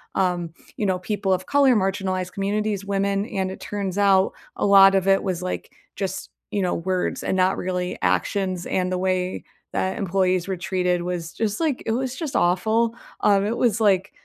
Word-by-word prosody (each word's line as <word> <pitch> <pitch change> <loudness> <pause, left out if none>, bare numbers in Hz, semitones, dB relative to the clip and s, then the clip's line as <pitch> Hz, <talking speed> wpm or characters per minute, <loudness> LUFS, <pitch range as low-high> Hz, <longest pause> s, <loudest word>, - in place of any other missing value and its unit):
um, 180 -3 0 0.3
you 210 - -1
know, 185 -2 +1
people 200 0 -2
of 185 0 -2
color, 280 -3 +4
marginalized 190 -2 -1
communities, 205 0 -1
women, 200 0 0
and 190 -3 -2
it - - -8
turns 200 -2 -4
out 195 -1 +4 0.2
a - - 0
lot 195 -1 +7
of 190 0 +1
it 195 0 +4
was, 185 -3 -2
like, 185 0 -4 0.2
just, 190 -1 -4 0.2
you 205 - 0
know, 180 - 0
words 185 +2 -2
and 190 - 0
not 185 +1 +2
really 180 0 -2
actions, 185 -3 0
and 185 -1 -1
the 185 - 0
way 185 0 -1 0.3
that 190 0 -1
employees 185 -3 +1
were 190 - -2
treated 180 0 0
was 175 -2 -4
just 215 -2 -2
like, 305 -6 0
it - - 0
was 255 +2 -1
just 300 -2 -5
awful. 220 +6 +2 0.3
Um, 200 -1 +4
it 220 +3 -1
was, 230 -3 +2
like, 195 -3 +2
190 Hz, 190 wpm, -23 LUFS, 185-205 Hz, 0.3 s, lot